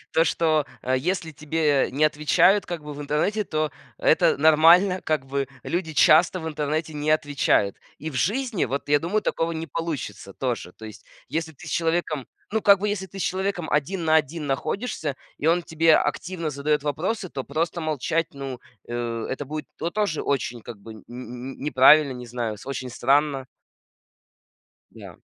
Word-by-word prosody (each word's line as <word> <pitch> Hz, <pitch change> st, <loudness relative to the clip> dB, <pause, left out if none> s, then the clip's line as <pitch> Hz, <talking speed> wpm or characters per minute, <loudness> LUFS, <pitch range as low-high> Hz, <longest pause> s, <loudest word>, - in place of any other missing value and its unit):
то, 165 Hz, -, +4 dB
что, 155 Hz, -3 st, +1 dB, 0.2 s
а, 130 Hz, +1 st, +1 dB
если 165 Hz, +3 st, -2 dB
тебе 150 Hz, -1 st, +1 dB
не 145 Hz, +4 st, +1 dB
отвечают, 155 Hz, +7 st, +4 dB
как 170 Hz, -3 st, -5 dB
бы, 150 Hz, -, -6 dB
в 145 Hz, -, -8 dB
интернете, 150 Hz, +9 st, 0 dB
то 155 Hz, -3 st, -1 dB, 0.3 s
это -, -, +4 dB
нормально. 165 Hz, +5 st, +5 dB
Как 155 Hz, -4 st, -1 dB
бы 135 Hz, 0 st, -2 dB, 0.2 s
люди 170 Hz, -2 st, -2 dB
часто 165 Hz, +5 st, +5 dB
в 160 Hz, -, -4 dB
интернете 155 Hz, +1 st, -2 dB
не 150 Hz, +1 st, -1 dB
отвечают. 145 Hz, -9 st, +2 dB, 0.2 s
И 155 Hz, -, -5 dB
в -, -, -11 dB
жизни, 220 Hz, -, 0 dB
вот, 140 Hz, +4 st, -4 dB
я 145 Hz, 0 st, +4 dB
думаю, 190 Hz, +7 st, 0 dB
такого 165 Hz, -4 st, -1 dB
не 160 Hz, 0 st, -4 dB
получится 150 Hz, -, -5 dB
тоже. 120 Hz, -6 st, -3 dB
То 110 Hz, -, -13 dB
есть, 110 Hz, -2 st, -10 dB, 0.2 s
если 160 Hz, 0 st, -3 dB
ты 140 Hz, -, -14 dB
с -, -, -6 dB
человеком, 165 Hz, -4 st, -1 dB, 0.3 s
ну, 220 Hz, -, +1 dB
как 200 Hz, -1 st, +7 dB
бы, 210 Hz, -, 0 dB
если 200 Hz, -2 st, -2 dB
ты 195 Hz, +2 st, -11 dB
с -, -, -2 dB
человеком 190 Hz, -3 st, -2 dB
один 165 Hz, +5 st, 0 dB
на 160 Hz, 0 st, +3 dB
один 155 Hz, 0 st, -1 dB
находишься, 145 Hz, -, -2 dB, 0.2 s
и 150 Hz, -, -2 dB
он 175 Hz, +2 st, +3 dB
тебе 160 Hz, -1 st, +4 dB
активно 170 Hz, -3 st, -2 dB
задает 150 Hz, +1 st, 0 dB
вопросы, 185 Hz, +8 st, -2 dB
то 135 Hz, -5 st, -5 dB
просто 165 Hz, +4 st, -2 dB
молчать, 155 Hz, +1 st, -1 dB
ну, 135 Hz, -3 st, -6 dB, 0.3 s
э, 120 Hz, -1 st, -3 dB
это 135 Hz, +2 st, -3 dB
будет 150 Hz, +1 st, -6 dB
то 170 Hz, -, -3 dB
тоже 205 Hz, -6 st, -1 dB
очень, 125 Hz, -4 st, -2 dB
как 120 Hz, -3 st, -9 dB
бы 110 Hz, +2 st, -10 dB
нь 110 Hz, -, -14 dB
нь 125 Hz, +2 st, -8 dB
неправильно, 145 Hz, 0 st, +6 dB
не 125 Hz, -1 st, -8 dB
знаю, 115 Hz, -2 st, -3 dB
с -, -, -14 dB
очень 130 Hz, -2 st, -4 dB
странно. 135 Hz, +2 st, +1 dB, 1.5 s
Да. -, -, -12 dB
155 Hz, 180 wpm, -24 LUFS, 135-165 Hz, 1.5 s, как